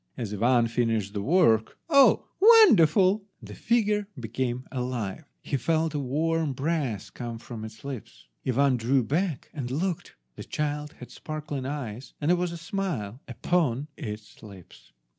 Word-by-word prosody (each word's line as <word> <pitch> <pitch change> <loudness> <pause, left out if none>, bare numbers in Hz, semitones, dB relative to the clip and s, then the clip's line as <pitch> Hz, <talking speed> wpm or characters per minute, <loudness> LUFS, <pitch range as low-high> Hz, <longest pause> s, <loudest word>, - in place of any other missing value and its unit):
As 110 -4 -4
Ivan 120 +3 +3
finished 115 -4 -1
the 100 - -2
work, 115 - +3
oh, 280 -4 +5
wonderful! 205 - +6 0.2
the - - -11
figure 210 -3 +1
became 125 +2 -3
alive! 125 -1 -3 0.2
He 140 - -1
felt 160 +4 0
a 150 - -1
warm 155 +3 0
breath 135 - -2
come 120 -2 -6
from 115 -1 -8
its 110 0 -10
lips. 135 -5 -8 0.2
Ivan 130 +1 +2
drew 125 +3 +2
back, 160 - -2
and 135 -5 -4
looked. 165 +6 -3 0.2
The - - -6
child 150 0 -3
had 125 - -12
sparkling 150 -4 -5
eyes, 130 -4 -6
and 150 - -1
there - - +5
was 175 -1 -1
a 170 - -6
smile 165 - -4
upon 145 +1 0
its 105 0 -8
lips. 95 - -14
135 Hz, 150 wpm, -27 LUFS, 115-165 Hz, 0.2 s, wonderful